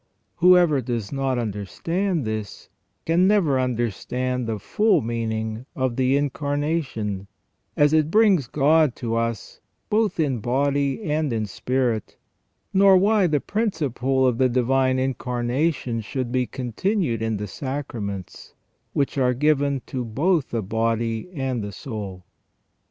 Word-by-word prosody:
Whoever 175 -5 +5
does 115 -4 -3
not 135 -2 -1
understand 140 - -2
this 110 -2 -5 0.4
can 170 +3 +3
never 175 -10 +3
understan~d 125 +1 -2
the 110 - -2
full 200 - +2
meaning 110 0 -3
of 130 -3 -1
the 130 +2 +2
Incarnation 145 - -2 0.5
as 145 +1 +4
it 155 -1 +3
brings 195 - +4
God 150 0 +3
to 115 -1 -3
us 115 -2 -3 0.3
both 215 -3 +1
in 135 -6 +1
body 140 - 0
and 155 -3 0
in 110 -2 -1
spirit, 120 +2 -2 0.6
nor 195 0 +6
why 200 0 +3
the 150 -3 +1
principle 140 - 0
of 125 -2 +1
the 130 -1 +4
Divine 130 +1 +2
Incarnation 125 0 -1
should 120 +3 -4
be 125 -1 0
continued 130 - -1
in 110 -1 -1
the 105 - -4
sacraments, 105 -6 -6 0.4
which 140 0 0
are 125 -1 +2
given 140 -1 +1
to 130 -2 -4
both 145 - 0
the 115 -2 -2
body 115 - -1
and 130 -5 -2
the 100 - -5
soul. 100 -7 -7
130 Hz, 130 wpm, -23 LUFS, 115-150 Hz, 0.6 s, nor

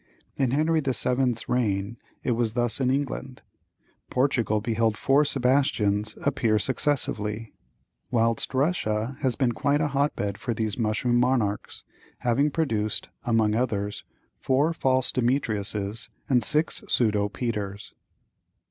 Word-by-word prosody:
In 135 -3 +1
Henry 155 +5 +2
the 135 -4 -1
Seventh's 125 -2 0
reign 110 -3 0 0.3
it 125 - 0
was 115 -2 0
thus 120 -1 -1
in 130 -2 +2
England; 135 -1 -3 0.7
Portugal 125 -5 +1
beheld 115 0 0
four 140 +5 +4
Sebastians 125 -7 +1
appear 120 -6 +2
successively; 115 -4 -1 0.6
whilst 115 +1 +1
Russia 130 -5 0
has 130 -4 0
been 130 -4 +1
quite 140 +5 +1
a 150 -1 +1
hotbed 135 -8 -1
for 120 -2 -2
these 110 -2 -1
mushroom 120 +2 +1
monarchs, 120 -5 0 0.4
having 130 +5 +2
produced, 115 -9 -1 0.2
among 110 -3 +2
others, 105 -4 -1 0.4
four 145 +5 +2
false 130 -4 +1
Demetriuses 110 -3 -1 0.2
and 125 -3 +3
six 150 +8 0
pseudo 105 -3 +2
Peters. 105 -4 -4
120 Hz, 120 wpm, -26 LUFS, 110-135 Hz, 0.7 s, four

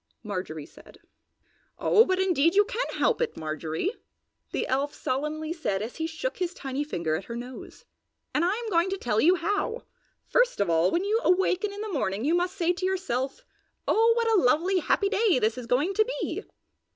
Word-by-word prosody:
Marjorie 180 -8 -5
said. - - -17 0.8
"Oh, 450 +1 +5
but 375 0 0
indeed 350 -3 +3
you 410 +1 +6
can - - -2
help - - +1
it, 480 - -1
Marjorie!" 155 - -3 0.6
the - - -1
elf 275 +3 -1
solemnly 305 +4 -2
said 210 - -2
as 230 - -7
he 320 0 -1
shook 330 +10 -4
his 360 -1 -2
tiny 270 +1 -3
finger 170 - -2
at 180 - -5
her 235 - -6
nose. 245 +2 -9 0.5
"And 300 - +2
I 355 - +3
am 465 0 -4
going 340 +1 +3
to 390 - -2
tell 220 - 0
you 350 +4 +5
how. 410 +7 -2 0.4
First - - +2
of 200 -4 +1
all, 165 +2 +3
when 345 - 0
you 430 +3 +1
awaken 375 +2 +2
in 405 +1 -7
the 430 -2 -4
morning 210 -5 -1
you 315 - +2
must 355 +2 0
say 350 -2 +1
to 365 +1 -3
yourself, 370 - -2 0.4
'Oh 455 +2 +4
what 465 -1 +1
a 420 -5 +4
lovely, 345 +9 +3
happy 400 +4 +1
day 415 - +3
this 220 -1 +1
is 250 -2 -7
going 290 +11 +1
to 435 - +4 0.2
be!' - - -3
335 Hz, 200 wpm, -27 LUFS, 245-395 Hz, 0.8 s, you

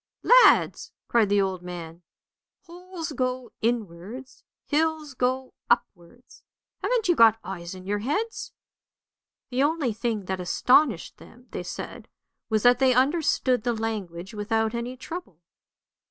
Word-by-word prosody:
"Lads!" - - +5
cried 225 -4 +3
the 205 0 +3
old 190 -2 -1
man, 175 -1 -8 0.6
"holes 350 -1 -8
go 255 -2 -2
inwards, 225 +2 -4 0.2
hills 310 -1 0
go 255 +1 -1 0.2
upwards! 240 0 -2 0.4
Haven't 485 -4 0
you 350 - +4
got 225 -3 +6
eyes 175 -1 -7
in 185 0 -11
your 205 +1 -1
heads? 310 - -3 0.5
" - - -67
The 250 +2 0
only 290 -5 +1
thing 220 -2 -2
that 190 0 -3
astonished 250 +11 +2
them, - - -16
they - - -4
said, - - -7 0.4
was 215 -2 +1
that 245 0 +5
they 260 -2 +4
understood 265 -3 +2
the 240 0 0
language 205 -4 -4
without 220 +1 -1
any 240 +2 -4
trouble. 315 - -8
240 Hz, 135 wpm, -26 LUFS, 205-280 Hz, 0.6 s, got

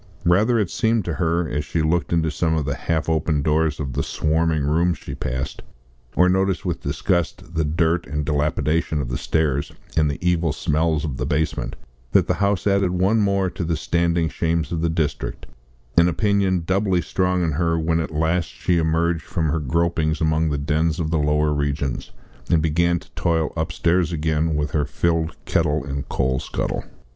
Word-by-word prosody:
Rather 105 +8 +4
it 105 -5 0
seemed 110 -4 +1
to 85 - -2
her, 85 0 0
as 75 -1 -2
she 80 +2 -1
looked 80 -1 0
into 80 -2 +1
some 80 +2 0
of 80 -3 -1
the 70 - -1
half 80 +2 -2
open 80 -2 +1
doors 80 0 +1
of 70 -4 -3
the - - 0
swarming 80 -1 0
rooms 85 +3 +2
she - - -8
passed, 65 +1 -4 0.5
or 90 - +5
noticed 95 0 +1
with 85 -2 -2
disgust 85 -2 -1
the 80 -1 +1
dirt 80 +3 +1
and 75 0 -2
dilapidation 75 +1 0
of 65 -4 -3
the 60 - -2
stairs, 70 -2 0 0.2
and 75 -2 +3
the 70 - -3
evil 85 -3 +1
smells 80 +1 0
of 70 -4 -4
the - - -2
basement, 75 +2 -1 0.4
that - - +5
the - - +1
house 100 -2 +1
added 100 -2 +3
one 95 +5 +2
more 100 -2 +2
to 90 - -4
the 85 -1 -1
standing 85 +1 +1
shames 80 0 -1
of 85 -2 -1
the 85 - +1
district 80 -2 -2 0.5
an 85 +1 +5
opinion 95 -2 +1
doubly 95 0 +1
strong 90 +1 0
in 80 - +1
her 80 +2 +1
when 80 +1 +1
at 80 - -2
last 80 +2 0
she 85 -2 0
emerged 80 +1 +1
from 80 -4 -2
her 80 +2 0
gropings 80 +1 0
among 80 0 +1
the 75 - -1
dens 80 +4 0
of 80 -1 -1
the 80 - +2
lower 75 0 +2
regions, 70 -2 -2 0.4
and 80 -3 +3
began 85 +2 +2
to - - -12
toil 80 -2 0
upstairs 85 +2 +1
again 80 0 0
with 75 0 -1
her 75 - +1
filled 80 +2 0
kettle 75 -3 +1
and 70 0 -5
coal 65 -1 0
scuttle. - - -3
80 Hz, 190 wpm, -22 LUFS, 75-85 Hz, 0.5 s, or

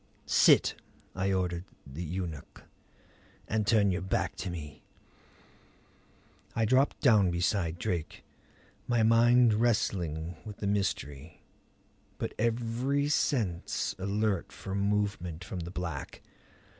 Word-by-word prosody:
"Sit," - - +5 0.4
I 95 +1 0
ordered 90 -2 -1 0.2
the 70 +5 -8
eunuch. 85 -3 -6 0.8
"And 110 -1 -1
turn 105 -3 +4
your 90 +1 -2
back 95 - -1
to 95 - -4
me." 75 -4 -7 1.7
I 115 - +2
dropped 130 +5 +2
down 105 -8 +5
beside 85 -1 0
Drake, 85 -2 -3 0.6
my 120 -2 +2
mind 120 +1 +5
wrestling 90 -8 0
with 105 -2 -8
the - - -5
mystery, 80 -7 -2 0.7
but - - -4
every 120 +5 0
sense 110 - 0
alert 100 -1 -1
for 95 - -7
movement 100 -4 -1
from 95 0 -6
the 85 0 -5
black. 85 -6 -6
95 Hz, 110 wpm, -30 LUFS, 85-110 Hz, 1.7 s, Sit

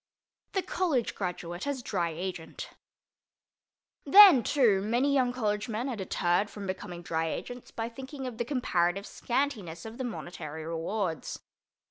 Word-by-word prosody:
THE 385 - 0
COLLEGE 310 -11 0
GRADUATE 180 +2 -4
AS 275 -3 -2
DRY 175 -6 0
AGENT 170 0 -6 1.3
Then, 375 -3 +9
too, 225 -7 +3
many 240 +7 +1
young 255 -3 +3
college 215 -2 -1
men 225 +4 -2
are 250 - -2
deterred 190 0 0
from 205 -2 -7
becoming 180 -2 -5
Dry 165 0 -1
Agents 245 +9 -5
by 225 0 -4
thinking 265 +3 -7
of 245 -2 -6
the - - +2
comparative 195 -8 0
scantiness 225 - -2
of 225 +3 -8
the - - -1
monetary 165 -9 -6
rewards. 165 +1 -3
210 Hz, 140 wpm, -29 LUFS, 175-255 Hz, 1.3 s, Then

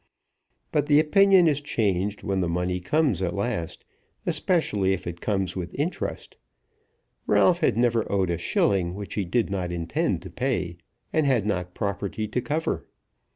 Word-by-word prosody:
But 150 -1 +1
the 145 0 +6
opinion 190 +3 +5
is 145 -2 +1
changed 100 -7 -1
when 95 -1 0
the 85 - 0
money 90 +1 -1
comes 130 - +1
at 90 -2 -1
last, 100 -5 -3 0.4
especially 105 - +1
if 95 -1 -4
it 85 0 -6
comes 95 -4 -1
with 90 -3 -5
interest. 155 +6 -3 0.9
Ralph 175 -1 +4
had 110 - +2
never 120 -2 +1
owed 95 -3 +1
a 85 - -2
shilling 90 +1 +1
which 100 -1 -6
he 100 - -1
did 110 +3 0
not 90 -3 -2
intend 85 - -1
to 95 - -9
pay, 95 -7 -2 0.4
and 155 -3 +2
had 120 -7 +2
not 90 -3 -2
property 100 +1 -3
to 125 - -1
cover. 150 +6 -2
100 Hz, 160 wpm, -25 LUFS, 90-135 Hz, 0.9 s, the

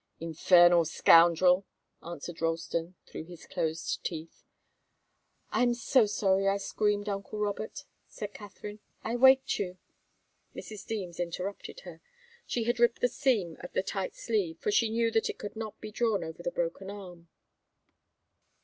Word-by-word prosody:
"Infernal 175 +1 +5
scoundrel!" 170 +3 +5 0.4
answered 170 0 -8
Ralston, 165 +1 -2
through 160 - -8
his 175 -1 -12
closed 160 0 -2
teeth. 165 -1 -6 1.1
"I'm 245 -1 +2
so 240 -1 +3
sorry 195 -1 +2
I 195 0 +3
screamed, 205 +1 -1
uncle 200 +1 -4
Robert," 210 +6 -3 0.2
said 205 -1 -7
Katharine. 205 0 -9 0.2
"I 230 - -2
waked 265 +2 +5
you 185 -2 -3 0.4
" - - -42
Mrs. 215 -2 -8
Deems 185 -6 -4
interrupted 180 - -5
her. - - -11 0.5
She 235 - -1
had 240 +1 0
ripped 240 0 +3
the - - +5
seam 220 - 0
of 180 - -9
the - - +1
tight 195 -1 -3
sleeve, 195 -8 -1
for 210 - -1
she 225 +2 +3
knew 230 +1 +1
that 225 0 +1
it - - -5
could 205 - -7
not 220 -1 -6
be 215 - -8
drawn 215 -4 0
over 160 +1 -7
the 175 - -1
broken 175 +3 -3
arm. 180 -4 -10
195 Hz, 150 wpm, -30 LUFS, 175-220 Hz, 1.1 s, Infernal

